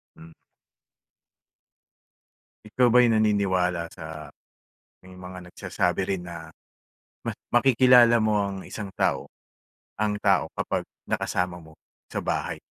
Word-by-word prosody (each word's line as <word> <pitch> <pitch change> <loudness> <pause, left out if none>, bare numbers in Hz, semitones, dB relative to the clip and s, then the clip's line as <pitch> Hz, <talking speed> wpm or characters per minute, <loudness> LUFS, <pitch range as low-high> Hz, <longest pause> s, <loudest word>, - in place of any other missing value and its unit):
Hmm. 80 0 -14 2.3
Ikaw 120 +3 +2
ba 125 - +4
ay 120 - +4
naniniwala 95 -5 +1
sa, 80 -2 -9 0.7
may 95 0 -14
mga 90 -1 -10
nagsasabi - - -1
rin 90 - -8
na, 80 -2 -9 0.7
mas - - -3 0.2
makikilala 120 -1 +6
mo 105 -1 +2
ang 100 -1 -2
isang 105 -3 -7
tao, - - 0 0.7
ang 105 -1 +1
tao 95 -5 +3
kapag - - -2 0.3
nakasama 90 0 -1
mo 80 -1 -16 0.4
sa - - -3
bahay - - -2
95 Hz, 115 wpm, -25 LUFS, 90-110 Hz, 2.3 s, makikilala